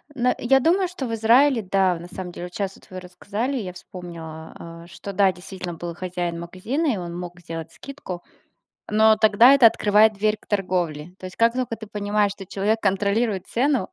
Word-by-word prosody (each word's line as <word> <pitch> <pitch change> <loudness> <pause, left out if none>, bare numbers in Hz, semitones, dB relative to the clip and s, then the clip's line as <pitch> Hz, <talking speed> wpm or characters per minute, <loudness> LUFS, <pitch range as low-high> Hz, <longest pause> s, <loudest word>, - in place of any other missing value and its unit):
ну, 250 -1 +2
я 270 +2 +3
думаю, 360 +5 +3
что 345 -7 -5
в 230 - -4
Израиле, 235 +3 +4
да, 190 -3 +2
на 175 - -9
самом 180 0 -7
деле, 175 - -7
вот 180 - -11
щас 195 -1 -3
вы 185 0 -7
рассказали, 205 +8 -4
я 190 -7 -5
вспомнила, 170 -4 -9
а, 170 0 -11
что, 190 +2 -8
да, 195 -1 +3
действительно 180 -1 -7
был 170 +1 -6
хозяин 175 -1 -4
магазина, 200 - -3
и - - -2
он 175 -2 -6
мог 175 0 -8
сделать 165 -1 -7
скидку. 255 -11 -8 0.7
Но 220 +1 +5
тогда 215 +4 +6
это 275 -4 +7
открывает 215 -1 +4
дверь 210 +1 0
к - - -23
торговле. 180 -5 -2
То 185 - -8
есть, 185 - -10
как 230 0 +4
только 250 -2 -3
ты 220 -1 -10
понимаешь, 205 0 0
что 195 -1 -11
человек 210 +4 0
контролирует 200 0 0
цену. 255 -4 0
200 Hz, 195 wpm, -23 LUFS, 180-225 Hz, 0.7 s, это